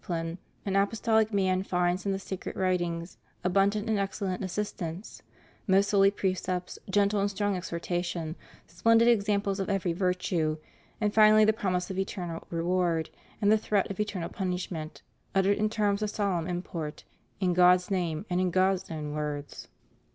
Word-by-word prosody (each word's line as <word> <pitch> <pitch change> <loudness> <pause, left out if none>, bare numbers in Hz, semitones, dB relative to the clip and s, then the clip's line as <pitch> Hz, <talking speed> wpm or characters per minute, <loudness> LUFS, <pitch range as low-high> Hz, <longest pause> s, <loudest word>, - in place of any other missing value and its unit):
275 165 -1 -6
pline, 195 - -1
an 195 - +5
apostolic 220 +1 +1
man 190 -2 +2
finds 180 0 0
in - - +2
the 195 - 0
sacred 190 -1 -6
writings 175 -2 -1 0.3
abun 195 +2 +4
dant 210 +1 -3
and 220 -2 +1
excellent 195 -1 -2
assistance; 185 -1 -5 0.5
most 195 +1 +3
holy 195 -1 +6
precepts, 185 -2 -2
gentle 205 +1 +2
and 200 - +1
strong 205 0 -1
exhortation, 175 -2 -3 0.3
splendid 230 +6 +3
examples 205 -3 +2
of 195 - -2
every 190 -3 0
virtue, 180 -3 0 0.4
and 210 -1 0
finally 215 0 +7
the 220 - +4
promise 185 -4 -1
of 190 - -3
eternal 175 -3 -4
reward 170 -1 0 0.3
and 205 - +5
the 220 - +5
threat 205 -2 0
of 195 - -7
eternal 205 -5 -2
punishment, 180 -4 -4 0.3
uttered 195 +2 +3
in 215 0 +2
terms 210 -2 0
of 210 - 0
solemn 190 -6 -1
import, 170 -4 -5 0.4
in 185 -2 +1
God's 180 +1 +5
name 175 -2 -1
and 180 0 0
in 185 - +2
God's 185 +1 +1
own 150 -2 -4
words. 150 -1 -5
185 Hz, 160 wpm, -28 LUFS, 175-200 Hz, 0.5 s, finally